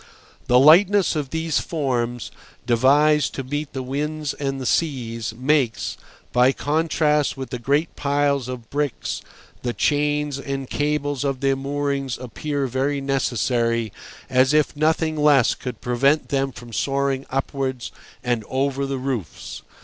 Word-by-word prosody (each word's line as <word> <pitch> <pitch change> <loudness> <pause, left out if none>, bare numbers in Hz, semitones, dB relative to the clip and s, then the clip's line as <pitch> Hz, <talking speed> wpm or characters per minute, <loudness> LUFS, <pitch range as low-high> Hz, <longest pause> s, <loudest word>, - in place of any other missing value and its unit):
The 125 - +5
lightness 180 +8 +6
of 145 -3 -2
these 160 0 0
forms, 120 -7 -2 0.3
devised 140 +5 +3
to 135 - -3
meet 145 +3 -4
the 130 -1 -3
winds 150 +2 -3
and 135 -1 -3
the 130 - -5
seas, 120 -7 -1
makes, 130 -3 +1 0.4
by 125 +2 +5
contrast 150 -1 +1
with 135 -1 -6
the 125 - -3
great 145 +7 0
piles 140 -2 +1
of 125 -3 -7
bricks, 145 -3 -2 0.4
the 120 -1 -2
chains 145 0 0
and 135 -1 -4
cables 145 -1 -1
of 135 -2 -2
their 135 -1 +2
moorings 140 -1 -2
appear 140 +4 -3
very 135 +3 -1
necessary, 120 -4 0 0.3
as 130 +3 +3
if 150 -1 +2
nothing 155 +1 +1
less 145 -4 +4
could 125 - -7
prevent 135 +5 +2
them 135 -1 0
from 120 -2 -11
soaring 135 +1 0
upwards 135 -2 -2 0.3
and 120 -3 0
over 135 +1 0
the 135 0 -2
roofs. 125 - -5
135 Hz, 140 wpm, -22 LUFS, 130-145 Hz, 0.4 s, lightness